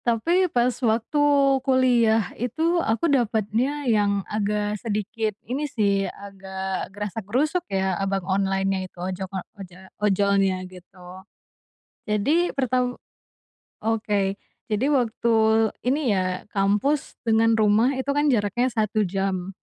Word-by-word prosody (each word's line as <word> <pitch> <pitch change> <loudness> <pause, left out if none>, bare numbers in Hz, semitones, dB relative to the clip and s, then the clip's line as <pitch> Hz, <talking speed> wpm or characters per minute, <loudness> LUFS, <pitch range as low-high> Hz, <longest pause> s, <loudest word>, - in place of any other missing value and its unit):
Tapi, 335 +11 +2
pas 245 -2 +1
waktu 230 +5 +1 0.4
kuliah 245 -6 +2
itu 320 +9 0
aku 230 +3 0
dapetnya 250 +1 0
yang 205 -4 +1
agak 210 0 -2
sedikit 215 -1 -2
ini 280 +6 -3
sih 200 -5 +1
agak 190 -1 -6
grasak-grusuk 225 - -2
ya 190 -1 0
abang 195 -1 -1
onlinenya 195 0 0
itu - - -37
ojok 185 +1 -4 0.3
oja 185 0 -13
ojolnya 195 -2 +2
gitu, 180 0 -13 0.8
jadi 285 +12 +1
pertam 250 -2 -1 0.9
oke 210 -3 0 0.3
jadi 215 +3 -1
waktu 235 -4 +1 0.5
ini 265 +4 +2
ya 190 -3 +1 0.2
kampus 205 +9 0
dengan 225 0 +3
rumah 220 +4 +3
itu 265 +1 -4
kan 290 +1 +2
jaraknya 220 +3 +1
1 215 -1 +1
jam, 190 0 -2
210 Hz, 115 wpm, -24 LUFS, 195-245 Hz, 0.9 s, dengan